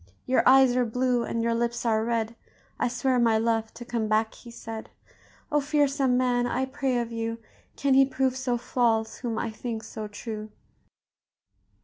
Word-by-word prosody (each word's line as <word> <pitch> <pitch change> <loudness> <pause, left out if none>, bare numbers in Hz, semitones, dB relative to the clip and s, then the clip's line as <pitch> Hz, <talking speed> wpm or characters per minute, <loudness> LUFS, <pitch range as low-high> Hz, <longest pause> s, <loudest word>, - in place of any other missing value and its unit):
Your 255 - +3
eyes 265 -1 +6
are 250 - +3
blue, 250 +1 +1
and 230 0 -2
your 230 0 +1
lips 235 +1 -1
are 220 -1 +2
red; 230 -1 -1 0.4
I - - +2
swear, 250 +1 +1
my 230 -2 +4
love, 225 0 0
to 240 +1 -8
come 235 -2 -2
back,' 220 +1 +1
he 240 - -13
said. 225 -1 -8 0.6
O, 295 0 +3
fearsome 280 -3 +2
man! 245 -1 +2
I 260 +1 0
pray 265 -1 -1
of 235 -1 -2
you, 230 0 -3 0.4
Can 275 -1 +1
he 270 +1 +7
prove 265 -1 0
so 260 -2 -1
false 225 -2 0
whom 235 -3 -3
I 230 - -2
think 225 0 -5
so 220 -1 -6
true?" 215 +1 -7
235 Hz, 175 wpm, -27 LUFS, 225-255 Hz, 0.6 s, he